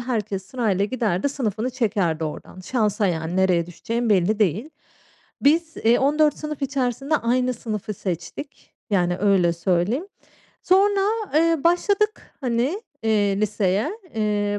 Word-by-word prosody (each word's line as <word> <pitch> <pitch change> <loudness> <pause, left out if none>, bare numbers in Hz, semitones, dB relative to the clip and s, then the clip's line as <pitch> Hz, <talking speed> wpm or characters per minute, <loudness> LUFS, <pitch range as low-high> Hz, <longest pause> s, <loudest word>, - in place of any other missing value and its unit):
Herkes 215 -6 -2
sırayla 210 -5 0
giderdi, 220 0 0
sınıfını 240 -3 -2
çekerdi 200 -10 0
oradan. 155 +4 -7
Şansa 210 0 0
yani, 165 -1 -2
nereye 180 -3 +2
düşeceğin 230 +6 -3
belli 200 +2 +3
değil. 210 - 0 0.7
Biz, 320 +2 +2
eee, 230 +2 +3
14 295 +2 +2
sınıf 300 -2 -6
içerisinde 275 +2 0
aynı 250 0 0
sınıfı 215 -2 -5
seçtik. 180 - -6 0.2
Yani, 180 -3 +1
öyle 190 -4 +3
söyleyeyim. 185 - 0 0.6
Sonra, 395 +2 +4 0.3
eee, 330 -1 +3
başladık, 405 +5 +1
hani, 255 - 0 0.2
eee, 205 -2 +1
liseye. 210 - 0 0.2
Eee, 205 -1 0
220 Hz, 125 wpm, -23 LUFS, 195-275 Hz, 0.7 s, Sonra